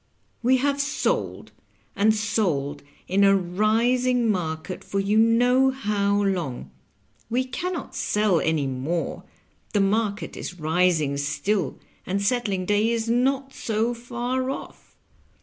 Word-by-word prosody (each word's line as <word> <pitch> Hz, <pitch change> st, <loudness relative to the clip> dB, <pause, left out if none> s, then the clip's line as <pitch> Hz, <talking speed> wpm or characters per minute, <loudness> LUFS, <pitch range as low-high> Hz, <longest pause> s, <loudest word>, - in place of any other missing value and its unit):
We 255 Hz, +2 st, +4 dB
have 280 Hz, +2 st, +1 dB
sold 280 Hz, +1 st, -2 dB, 0.4 s
and 210 Hz, +2 st, +4 dB
sold 170 Hz, -10 st, -1 dB, 0.3 s
in 195 Hz, +2 st, +2 dB
a 195 Hz, 0 st, +6 dB
rising 230 Hz, +6 st, +2 dB
market 170 Hz, -1 st, -4 dB
for 195 Hz, -, -2 dB
you 200 Hz, +2 st, +1 dB
know 245 Hz, +4 st, +4 dB
how 205 Hz, -5 st, 0 dB
long; 175 Hz, -10 st, -2 dB, 0.6 s
we 250 Hz, +3 st, +1 dB
can 305 Hz, +9 st, -4 dB
not 315 Hz, -, -6 dB
sell 210 Hz, -5 st, +2 dB
any 160 Hz, -3 st, 0 dB
more, 135 Hz, +6 st, -3 dB, 0.5 s
the 205 Hz, -, +3 dB
market 205 Hz, +1 st, 0 dB
is 180 Hz, -, -7 dB
rising 160 Hz, -3 st, +2 dB
still, 190 Hz, +8 st, -1 dB, 0.3 s
and 195 Hz, +2 st, -1 dB
settling 200 Hz, -3 st, 0 dB
day 210 Hz, +3 st, +2 dB
is 230 Hz, -1 st, -1 dB
not 265 Hz, +3 st, +1 dB
so 225 Hz, +2 st, -1 dB
far 245 Hz, +2 st, -3 dB
off. 270 Hz, -, -8 dB
210 Hz, 130 wpm, -24 LUFS, 180-245 Hz, 0.6 s, a